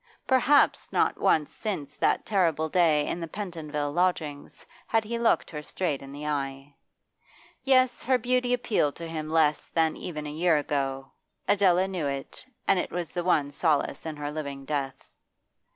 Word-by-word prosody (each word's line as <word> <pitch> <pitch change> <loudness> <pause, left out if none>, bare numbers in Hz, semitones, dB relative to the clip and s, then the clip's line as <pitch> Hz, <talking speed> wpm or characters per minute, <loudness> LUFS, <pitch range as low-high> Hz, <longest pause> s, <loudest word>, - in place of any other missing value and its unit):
Perhaps 265 +2 +3
not - - +1
once 150 -2 +2
since 150 -10 -4
that - - +1
terrible 165 -6 +1
day 155 -4 +3
in - - -2
the 165 - -4
Pentonville 155 -6 -4
lodgings 160 -4 -2 0.2
had 225 -1 +2
he 235 +2 -3
looked 235 - +2
her 150 -2 -5
straight 150 -2 -2
in 135 0 -10
the 145 +2 -7
eyes. 135 -2 -3 0.9
Yes, 255 -2 +3
her 260 +1 +2
beauty 250 +1 0
appealed 235 -12 +1
to 170 - -7
him 155 -1 -5
less 155 -2 +2
than 160 -1 +1
even 150 -4 -6
a 150 - -5
year 165 +1 +2
ago; 135 -2 -2 0.4
Adela 190 -2 +4
knew 180 -6 -2
it, 140 -1 -5 0.2
and 190 - +4
it - - -2
was 175 -1 -4
the 175 - -3
one 150 -5 +2
solace 155 +1 0
in 155 - -4
her 145 0 -4
living 140 -3 -5
death. 135 -3 -3
160 Hz, 170 wpm, -27 LUFS, 145-185 Hz, 0.9 s, Adela